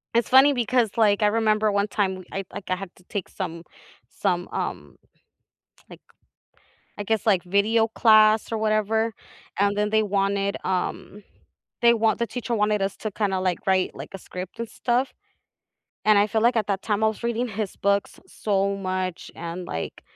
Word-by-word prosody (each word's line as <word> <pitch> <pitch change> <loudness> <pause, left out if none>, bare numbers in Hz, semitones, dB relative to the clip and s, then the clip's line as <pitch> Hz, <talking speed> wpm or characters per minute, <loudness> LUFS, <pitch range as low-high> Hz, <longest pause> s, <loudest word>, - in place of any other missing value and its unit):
It's 235 - +2
funny 265 +3 +7
because, 245 -2 +1
like, 210 -2 +3
I 210 - +4
remember 215 0 +2
1 200 0 +1
time 190 -3 -1
I 195 - -3
like, 185 - -7
I - - +3
had 190 0 -7
to 180 - -22
take 200 -4 -4
some 165 +1 -5 0.5
some, 180 -3 -1
um, - - -4 0.9
like, - - -13 1.0
I 205 - -4
guess, 220 +1 -1
like, 190 -5 +3
video 210 +5 +2
class 215 -1 +4
or 225 - 0
whatever, 220 +1 +1 0.5
and 200 +1 +2
then 210 0 0
they 220 0 +3
wanted, 200 -1 0
um, 190 +2 -3 0.6
they 235 0 +6
want 225 -1 +1
the 235 - 0
teacher 240 0 -4
wanted 210 -1 +1
us 195 0 -2
to 215 - -4
kinda, 195 -2 0
like, 185 -2 0
write, 190 -1 +2
like, - - -9
a - - -5
script 185 +2 -8
and 230 - -4
stuff 250 +2 0 0.9
and 215 -1 +6
I 205 - +4
feel 220 0 0
like, 235 +1 +3
at 215 - +1
that 195 -1 -1
time 210 -1 -1
I - - +5
was 220 - -5
reading 235 +1 -1
his 215 -2 -4
books 200 0 0
so 200 -1 -1
much 185 -2 -3
and, 170 +2 -6
like, 80 - -5
210 Hz, 180 wpm, -24 LUFS, 195-220 Hz, 1.0 s, funny